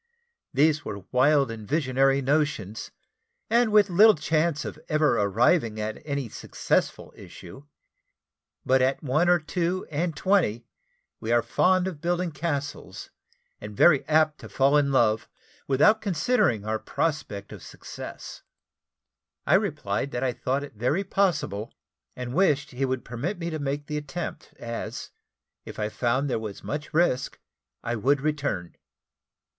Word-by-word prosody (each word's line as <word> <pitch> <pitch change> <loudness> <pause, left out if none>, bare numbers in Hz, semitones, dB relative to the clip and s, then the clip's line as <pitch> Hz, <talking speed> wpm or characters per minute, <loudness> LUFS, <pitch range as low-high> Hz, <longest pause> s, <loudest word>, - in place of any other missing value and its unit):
These 150 +2 +2
were 100 -2 -6
wild 135 0 +3
and 110 -2 -8
visionary 135 -2 +2
notions, 135 -8 -1 0.6
and 235 -1 +3
with 210 -1 +5
little 210 +4 +7
chance 155 0 0
of - - -7
ever 155 -5 +2
arriving 110 - +2
at 110 0 -4
any 140 -4 -3
successful - - -2
issue; 135 +2 -12 1.0
but 130 0 +3
at 130 +4 +1
one 155 +6 +2
or 175 - +6
two 175 +3 -2
and 160 +2 -1
twenty, 175 - +1 0.5
we 110 - -3
are 120 0 +3
fond 185 0 +2
of 170 -6 -5
building 175 0 -1
castles, 145 -1 -5 0.5
and 105 -1 -9
very 155 -6 +5
apt 155 0 +2
to - - -11
fall 140 +2 +3
in 145 -2 +3
love, 110 -4 +2 0.4
without 210 +12 +4
considering 170 - +1
our 110 0 -1
prospect 140 -13 -3
of - - -10
success. - - -9 1.0
I - - +2
replied 100 +7 0
that 120 - -2
I 130 -2 0
thought 135 +4 -2
it 145 - -9
very 125 - 0
possible, 150 - -1 0.4
and 125 0 -5
wished 150 -5 +2
he 135 +1 -1
would 130 -1 -3
permit 135 - -4
me 170 -1 -4
to 155 - -3
make 145 +1 -3
the 150 0 -4
attempt, 155 +1 -6
as, 115 0 -6 0.5
if - - -10
I 105 0 -2
found 125 +5 0
there 125 - -1
were 105 -3 -6
much 150 +1 -5
risk, 155 -5 +1 0.5
I 120 0 -2
would 135 +6 +2
return. 140 - -2
145 Hz, 145 wpm, -26 LUFS, 120-160 Hz, 1.0 s, little